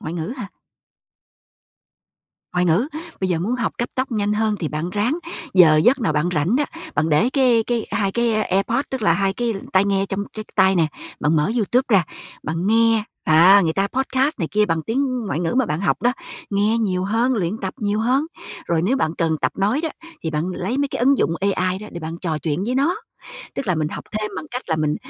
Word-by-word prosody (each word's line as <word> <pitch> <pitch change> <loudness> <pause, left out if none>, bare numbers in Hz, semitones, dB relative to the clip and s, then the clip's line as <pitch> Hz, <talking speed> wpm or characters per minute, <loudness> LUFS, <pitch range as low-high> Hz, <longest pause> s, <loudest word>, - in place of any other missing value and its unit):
Ngoại 155 - -5
ngữ 175 +7 -3
hả? 205 -6 -6 2.0
Ngoại 180 0 +1
ngữ. 180 - +2 0.3
Bây 190 - 0
giờ 175 -3 +1
muốn 205 +9 -1
học 235 - -1
cấp 240 - -1
tốc 260 -1 -2
nhanh 205 -1 0
hơn 215 0 +1
thì 160 - -1
bạn 155 +4 -3
ráng 220 - 0 0.4
giờ 165 -5 +7
giấc 245 - +4
nào 195 -9 +1
bạn 150 +3 +1
rảnh 170 - +2
đó, 295 - +2 0.3
bạn 155 +3 +1
để 155 +10 +3
cái 250 -5 +4
cái 235 -2 -1
2 195 -1 0
cái 235 -1 +1
AirPod, 205 +6 +1
tức 265 -3 -3
là - - +4
2 195 -1 +1
cái 235 +1 -1 0.2
tai 190 +1 +4
nghe 195 -1 +1
trong 195 +1 -3
cái 215 -1 -6
tai 190 -1 +4
nè. 165 -2 +3 0.3
Bạn 155 +2 +2
mở 150 +7 +2
YouTube 240 +4 +2
ra 195 -7 +4 0.4
bạn 165 +4 -2
nghe. 225 0 +3 0.2
À! 175 +6 +7
Người 160 - +1
ta 195 +3 +1
podcast 265 +4 0
này 165 -5 -2
kia 210 +1 +3
bằng 165 -3 0
tiếng 255 - -1
ngoại 160 -4 -2
ngữ 170 +3 -1
mà 260 -1 +2
bạn 150 -1 -2
học 200 - 0
đó. 245 +1 +3 0.4
Nghe 210 +3 +2
nhiều 185 -5 0
hơn, 230 +6 +1
luyện 195 +1 -1
tập 190 -1 -4
nhiều 210 0 0
hơn! 260 +6 +2 0.4
Rồi 165 -1 +1
nếu 245 +9 +2
bạn 160 -9 0
cần 160 -1 +1
tập - - +1
nói 205 +8 +1
đó, 325 - -1 0.3
thì 160 - -2
bạn 155 +1 -1
lấy 240 +8 -2
mấy 285 0 +1
cái - - -4
ứng 270 +3 +3
dụng - - +2 0.2
AI 185 0 0
đó 210 - -9
để 170 - -6
bạn 160 +1 -5
trò 160 -4 -2
chuyện 160 +4 -2
với 250 - -1
nó. 290 +8 +2 0.6
Tức 275 - -4
là 185 - +2
mình 155 -1 -1
học - - -7
thêm 215 0 -2
bằng - - -5
cách 250 +1 -4
là 160 - +1
mình 155 -1 0
200 Hz, 230 wpm, -21 LUFS, 170-235 Hz, 2.0 s, giờ